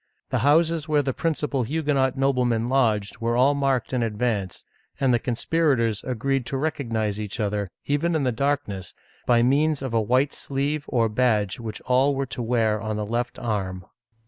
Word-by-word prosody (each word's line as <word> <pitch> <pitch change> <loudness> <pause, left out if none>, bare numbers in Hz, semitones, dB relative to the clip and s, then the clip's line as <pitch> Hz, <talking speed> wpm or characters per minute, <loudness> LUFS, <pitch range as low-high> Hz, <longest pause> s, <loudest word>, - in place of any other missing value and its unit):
The - - +1
houses 160 +2 +2
where 150 -1 +3
the 135 -1 -1
principal 150 -4 -1
Huguenot 140 0 0
noblemen 125 -4 +1
lodged 110 -6 +1
were 115 +1 0
all 135 +3 +5
marked 135 -3 0
in 125 - +1
advance, 105 -4 -2 0.3
and 135 -3 +3
the 120 - +3
conspirators 120 -3 0
agreed 130 +1 -1
to 135 - -2
recognize 115 -8 -2
each 105 -2 -5
other, 105 -2 -1 0.2
even 155 +4 0
in 155 - +1
the 130 - +1
darkness, 115 -7 -2 0.3
by 120 -1 +4
means 145 +3 +2
of 130 -3 -4
a 115 - +3
white 130 +6 +2
sleeve 145 +2 -2
or 115 -2 +2
badge 110 -3 +1
which 110 -3 -6
all 130 +3 +2
were 135 0 -1
to 125 -1 -6
wear 110 -3 +1
on 110 0 -3
the 105 - -2
left 120 +3 -2
arm. 95 -7 -3
125 Hz, 175 wpm, -24 LUFS, 110-140 Hz, 0.3 s, all